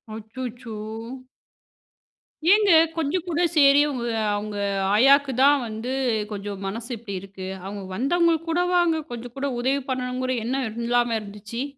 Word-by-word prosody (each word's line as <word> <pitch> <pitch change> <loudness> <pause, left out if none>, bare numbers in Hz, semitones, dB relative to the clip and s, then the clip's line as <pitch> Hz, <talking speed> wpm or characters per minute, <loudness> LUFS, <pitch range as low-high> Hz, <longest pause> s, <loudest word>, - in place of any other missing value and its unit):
அச்சச்சோ! 230 +1 -7 1.8
ஏங்க 415 -3 +4 0.2
கொஞ்சம் 325 +2 -1
கூட 345 0 0
சரி 280 -1 +6
அவுங்க 245 -4 -3 0.3
அவுங்க 205 0 -4 0.4
ஆயாக்கு 275 +3 +5
தான் 280 -2 +5
வந்து 220 +4 -5 0.4
கொஞ்சம் 200 -1 -5
மனசு 230 +5 -5
இப்பிடி 200 -4 -6
இருக்கு. 195 -1 -9 0.2
அவுங்க 200 0 -6
வந்தவங்களுக்கு 330 - +1
கூட 350 +2 +2
வாங்க 335 -2 +3
கொஞ்சம் 240 +1 -7
கூட 280 +1 -1
உதவி 275 +2 +1
பண்ணணுங்குற 255 0 -2
எண்ணம் 260 0 -1 0.2
இல்லாம 240 -1 +2
இருந்துச்சு? 210 +4 -6
250 Hz, 125 wpm, -24 LUFS, 220-280 Hz, 1.8 s, சரி